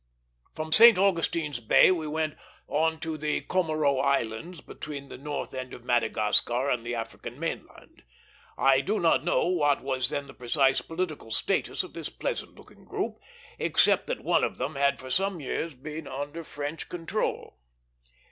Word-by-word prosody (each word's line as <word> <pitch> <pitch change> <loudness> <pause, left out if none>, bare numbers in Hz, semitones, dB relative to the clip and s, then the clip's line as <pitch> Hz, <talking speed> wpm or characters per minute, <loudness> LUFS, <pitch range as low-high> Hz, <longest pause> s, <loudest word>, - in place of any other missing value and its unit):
From 155 0 -5
St. 230 +2 +9
Augustine's 165 -7 +1
Bay 115 +9 +6
we 165 -4 -1
went 155 0 -1 0.3
on 160 +2 +1
to 160 -2 -4
the 150 0 0
Comoro 155 -6 +1
Islands, 140 +5 -1
between 140 -2 -8
the - - -8
north 145 +1 -4
end 130 -1 -5
of 120 - -13
Madagascar 120 +2 +2
and 120 -2 0
the 120 +1 -3
African 115 -1 -6
main - - -3
land. - - -19 0.6
I 135 0 +4
do 210 +10 -1
not 165 -3 +3
know 175 - +2
what 145 -6 +2
was 130 -1 0
then 140 0 -3
the 135 - -12
precise 135 +2 +2
political 165 -7 -4
status 110 - 0
of - - -11
this - - -5
pleasant - - -4
looking - - -17
group, - - -4 0.4
except - - +3
that - - -3
one - - +3
of - - -1
them 150 - -3
had 140 0 +1
for 130 0 -8
some 195 +3 0
years 150 +2 -3
been 150 +5 -7
under 145 +5 -5
French 145 +1 -6
control. 175 - -3
145 Hz, 165 wpm, -28 LUFS, 130-165 Hz, 0.6 s, St